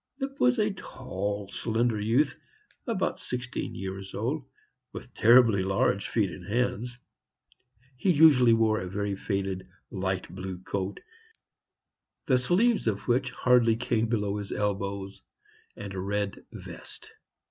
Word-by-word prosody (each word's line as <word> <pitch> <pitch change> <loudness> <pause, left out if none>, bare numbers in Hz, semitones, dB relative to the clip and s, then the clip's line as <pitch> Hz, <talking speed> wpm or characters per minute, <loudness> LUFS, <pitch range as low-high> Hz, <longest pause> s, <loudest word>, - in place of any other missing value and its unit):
Lipp 275 0 -4
was 250 0 +4
a 215 -1 +1
tall, 105 - -4
slender 115 -1 0
youth, 125 +7 +2 0.5
about 200 -6 -1
sixteen 125 0 -4
years 95 0 -6
old, 130 +9 -2 0.5
with 125 - -9
terribly 115 -3 +6
large 95 +1 +1
feet 105 -5 +1
and 80 - -9
hands. 125 +2 -1 1.0
He 185 - +2
usually 145 -7 +6
wore 110 -1 +3
a 90 - -5
very 100 +1 -2
faded, 95 -2 -3 0.2
light 95 -1 -2
blue 95 0 -5
coat, 100 0 -3 1.2
the 130 -2 +3
sleeves 200 - +2
of 100 -2 -1
which 130 +2 +2
hardly 120 -3 +3
came 115 -1 0
below 105 -3 -1
his 100 -1 -6
elbows, 100 -1 -3 0.5
and 100 -1 -7
a 95 - -4
red 100 +1 -2
vest. - - -10
110 Hz, 130 wpm, -28 LUFS, 100-125 Hz, 1.2 s, terribly